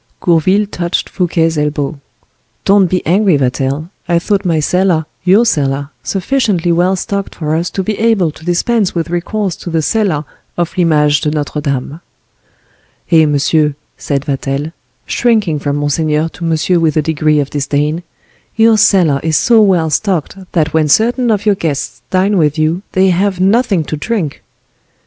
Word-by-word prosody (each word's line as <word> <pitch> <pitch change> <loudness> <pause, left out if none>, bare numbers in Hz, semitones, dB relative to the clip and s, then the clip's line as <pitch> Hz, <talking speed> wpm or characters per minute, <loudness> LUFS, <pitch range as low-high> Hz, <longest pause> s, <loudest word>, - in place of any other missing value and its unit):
Gourville 185 +5 +2
touched 175 -3 -3
Fouquet's 165 -3 0
elbow. 150 -1 -2 0.7
"Don't 195 -1 +4
be 185 +1 -2
angry, 185 -1 +3
Vatel; 135 +5 -2 0.2
I 170 - +3
thought 195 +3 0
my 165 -3 +1
cellar—your 180 +5 +1
cellar—sufficiently 175 - -1
well 180 +3 +2
stocked 200 +2 -4
for 155 -2 -3
us 170 +2 -1
to 190 - -3
be 210 +2 -3
able 215 -7 +2
to 155 - -16
dispense 185 +4 0
with 170 0 -2
recourse 180 +1 -2
to - - -7
the 165 -1 0
cellar 180 -7 0 0.3
of 175 -1 -2
L'Image 150 -4 +2
de 150 - 0
Notre 150 0 -3
Dame." 140 +2 -3 1.1
"Eh, 160 -2 +5
monsieur," 150 +1 +1 0.2
said 140 -1 -3
Vatel, 140 +1 -3 0.3
shrinking 215 -10 +1
from 145 -1 -2
monseigneur 150 +2 0
to 170 - -8
monsieur 165 +2 +1
with 160 -2 +1
a 155 - +2
degree 155 -1 +1
of 140 -1 -2
disdain: 150 +3 -1 0.5
"your 225 -1 +4
cellar 175 -9 +3
is 160 -1 +1
so 230 -2 +4
well 175 -6 +2
stocked 185 -1 -1 0.2
that 160 -3 0
when 160 -1 +2
certain 240 - +2
of 210 -1 0
your 210 - +4
guests 160 -7 -3
dine 190 +1 +1
with 150 -1 +1
you 155 +3 0
they 190 -1 +3
have 190 +1 0
nothing 195 -2 +2
to 155 - -4
drink." 180 -4 -3
165 Hz, 160 wpm, -14 LUFS, 150-195 Hz, 1.1 s, Eh